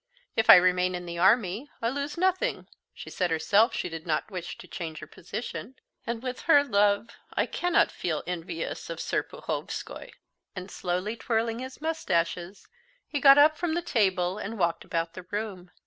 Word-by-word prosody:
If 225 - +1
I - - +13
remain 180 0 +3
in 175 0 -6
the 170 0 -5
army, 210 +6 +3
I 230 - 0
lose 285 +4 -4
nothing. 375 +8 0 0.2
She - - -10
said 180 -2 0
herself 200 +8 +3
she - - -2
did 165 0 -8
not 160 +6 -1
wish 180 -2 -6
to - - -12
change 165 -3 -6
her - - -7
position. 225 +6 -7 0.3
And 235 0 -3
with 255 -1 -4
her 290 -3 +7
love 205 -3 +2 0.3
I - - +2
cannot 355 -1 +2
feel 160 -4 -3
envious 170 -2 -5
of 165 - -4
Serpuhovskoy." - - -4 0.5
And 185 +1 -7
slowly 185 +5 -2
twirling 230 0 -1
his 260 +3 -8
mustaches, 180 - -2 0.4
he 290 - -2
got 275 0 +9
up 305 +2 +6
from 345 -2 -1
the 345 - -1
table 190 - +1
and 225 +2 -5
walked 170 -3 0
about 165 0 -2
the 185 - -8
room. 205 -4 -4
200 Hz, 175 wpm, -27 LUFS, 175-255 Hz, 0.5 s, I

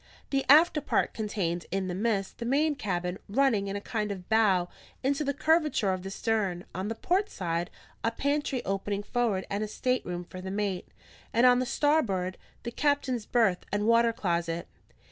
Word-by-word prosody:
The 270 -1 +1
after 310 +1 +7
part - - 0
contained, 190 -6 -2
in 190 0 -1
the 180 - -3
midst, 200 0 -1
the - - -3
main 295 +5 +2
cabin, 180 -8 -3
running 225 -3 +2
in 195 - -3
a - - -2
kind 210 0 -3
of 185 -3 -7
bow 205 -5 +3 0.4
into 275 +3 +1
the 280 - 0
curvature 300 - +2
of 185 - -4
the 190 - -6
stern; 195 -4 -1
on 190 +2 -3
the 225 - -3
port 375 - 0
side, 170 -2 -2 0.3
a 230 - +3
pantry 280 -1 -1
opening 200 +1 -2
forward 215 -3 0
and 200 +2 -1
a - - -2
stateroom 210 -7 -2
for 185 +1 -9
the 190 - -6
mate; 195 -2 -2 0.5
and 235 +2 +4
on 250 0 +6
the 255 - -1
starboard, 205 -12 +1 0.2
the 235 - -4
captain's 260 -4 0
berth 220 -7 +2
and 205 +1 0
water 230 +1 +5
closet. 170 -6 -2
210 Hz, 185 wpm, -29 LUFS, 190-255 Hz, 0.5 s, after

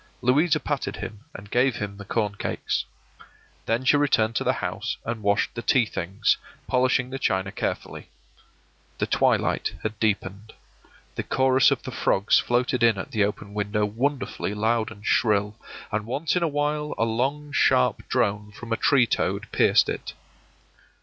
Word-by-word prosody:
Louisa 150 +6 +3
patted 145 -3 -3
him 100 +4 -8
and 100 +1 -10
gave 125 0 +3
him 100 -1 -5
the 100 - -9
corn 105 -1 -1
cakes. 105 - -2 0.8
Then 115 +3 0
she 145 - +5
returned 115 -6 +2
to - - 0
the - - +2
house - - -3
and 115 -1 -3
washed 100 -1 +1
the 120 - -5
tea 125 0 +3
things, 95 +2 0 0.3
polishing 130 0 +1
the 135 - -4
china 95 -4 0
carefully. - - -4 0.9
The - - 0
twilight - - +1
had 110 -1 -4
deepened; 105 -1 -2 0.6
the - - -3
chorus 130 0 +3
of - - -1
the - - -6
frogs 100 +2 +2
floated 125 0 0
in 115 -3 +4
at 95 - -6
the 110 -2 +2
open 100 0 -3
window 105 0 0
wonderfully 120 -1 -2
loud 110 +1 +1
and 105 -1 -12
shrill, 105 -2 +2 0.4
and 105 0 -2
once 145 +8 -1
in 180 - +1
a 170 - +2
while 150 0 -1
a 115 - +2
long 135 +6 -1
sharp 65 - +3
drone 105 +1 0
from 115 +2 -5
a - - 0
tree 135 -4 +4
toad - - -1
pierced - - +4
it. - - -4
115 Hz, 165 wpm, -25 LUFS, 105-130 Hz, 0.9 s, she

